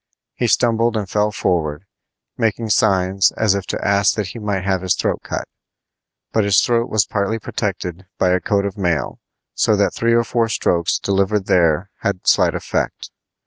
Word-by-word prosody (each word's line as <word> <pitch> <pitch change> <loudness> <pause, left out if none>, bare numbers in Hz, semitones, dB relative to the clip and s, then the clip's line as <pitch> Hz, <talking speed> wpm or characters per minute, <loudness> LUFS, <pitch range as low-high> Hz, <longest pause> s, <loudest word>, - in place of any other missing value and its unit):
He 120 - -1
stumbled 115 -1 +2
and 105 -2 -3
fell 105 +2 0
forward, 85 -4 -1 0.5
making 110 0 -1
signs 95 0 +3
as 110 -3 +3
if 100 -1 -3
to - - -3
ask 100 -1 +3
that 105 -4 -3
he 115 - -8
might 100 -3 -2
have 95 -2 0
his 95 -1 +1
throat - - -1
cut. - - -4 0.8
But 110 - +2
his 100 -1 +4
throat 120 -1 +1
was 110 -3 +2
partly 100 +4 -1
protected 95 -4 -4
by 95 - +2
a 90 0 +2
coat 100 +1 0
of 100 +1 -5
mail, 85 -4 -1 0.3
so 110 - +2
that 100 0 +1
three 115 0 +1
or 115 - +3
four 115 0 0
strokes 85 -5 +1
delivered 100 +1 0
there 85 +1 +2
had 100 -2 -3
slight - - +3
effect. - - -3
100 Hz, 180 wpm, -19 LUFS, 95-110 Hz, 0.8 s, his